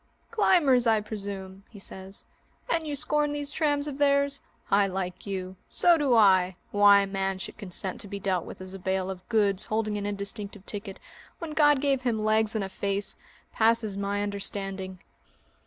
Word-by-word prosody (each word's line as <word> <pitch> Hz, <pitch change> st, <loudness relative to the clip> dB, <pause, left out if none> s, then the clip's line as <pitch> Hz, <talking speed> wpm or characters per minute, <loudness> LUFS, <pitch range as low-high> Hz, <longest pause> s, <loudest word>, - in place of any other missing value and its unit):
"Climbers, 300 Hz, -, +4 dB
I 220 Hz, -1 st, +4 dB
presume?" 200 Hz, -2 st, -6 dB
he 215 Hz, -, -14 dB
says, 190 Hz, 0 st, -7 dB, 0.4 s
"and 330 Hz, -1 st, 0 dB
you 295 Hz, -, -2 dB
scorn 295 Hz, +1 st, 0 dB
these 290 Hz, 0 st, -4 dB
trams 290 Hz, -2 st, +1 dB
of 285 Hz, -1 st, -6 dB
theirs? 280 Hz, 0 st, +3 dB, 0.3 s
I 200 Hz, 0 st, +4 dB
like 185 Hz, 0 st, -4 dB
you. 190 Hz, -1 st, -4 dB
So 350 Hz, -1 st, +5 dB
do 285 Hz, -6 st, +2 dB
I! 190 Hz, -4 st, +5 dB, 0.2 s
Why 205 Hz, 0 st, +7 dB
a -, -, 0 dB
man 195 Hz, -1 st, -2 dB
should 190 Hz, -, -8 dB
consent 190 Hz, -2 st, -3 dB
to -, -, -9 dB
be 200 Hz, 0 st, -5 dB
dealt 185 Hz, -3 st, 0 dB
with -, -, -10 dB
as 185 Hz, 0 st, -8 dB
a 195 Hz, -, -7 dB
bale 190 Hz, 0 st, -1 dB
of 185 Hz, -1 st, -10 dB
goods 205 Hz, -3 st, +2 dB
holding 215 Hz, -1 st, -1 dB
an 200 Hz, -, -4 dB
indistinctive 200 Hz, 0 st, -6 dB
ticket 200 Hz, -2 st, -6 dB, 0.4 s
when 330 Hz, -2 st, -6 dB
God 295 Hz, -3 st, +4 dB
gave 275 Hz, -2 st, +1 dB
him 225 Hz, -4 st, -1 dB
legs 220 Hz, 0 st, +2 dB
and 215 Hz, -, 0 dB
a 195 Hz, -, -4 dB
face 200 Hz, +1 st, -2 dB, 0.4 s
passes 225 Hz, -2 st, +2 dB
my 200 Hz, +1 st, -1 dB
understanding." 195 Hz, -2 st, -4 dB
205 Hz, 180 wpm, -27 LUFS, 195-260 Hz, 0.4 s, Why